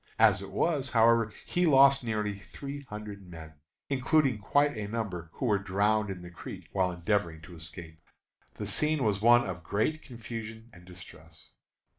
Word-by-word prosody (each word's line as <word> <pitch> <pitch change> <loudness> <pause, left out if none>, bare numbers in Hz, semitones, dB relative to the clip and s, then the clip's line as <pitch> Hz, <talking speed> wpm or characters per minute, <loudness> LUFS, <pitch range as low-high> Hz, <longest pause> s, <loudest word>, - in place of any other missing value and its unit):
As - - +5
it 100 - -8
was, 140 - 0
however, 115 -1 +4
he 175 0 +1
lost 135 -2 +6
nearly 105 -3 -2
three 140 +6 -8
hundred 105 -1 -7
men, 80 -2 -10 0.3
including 135 -2 +2
quite 145 +7 +2
a 105 -2 -4
number 100 -7 -4
who - - -4
were 105 -4 +2
drowned 105 +2 +1
in 90 -2 -6
the 90 - -10
creek 85 - -9
while 95 -2 +1
endeavoring 85 -1 -1
to 85 +2 -12
escape. 80 0 -9 0.5
The - - -5
scene 150 -2 +1
was 105 -2 +1
one 120 +2 +5
of 90 -3 -5
great 110 - -1
confusion 115 -2 -8
and 90 -1 -15
distress. 90 0 -13
105 Hz, 165 wpm, -29 LUFS, 95-125 Hz, 0.5 s, lost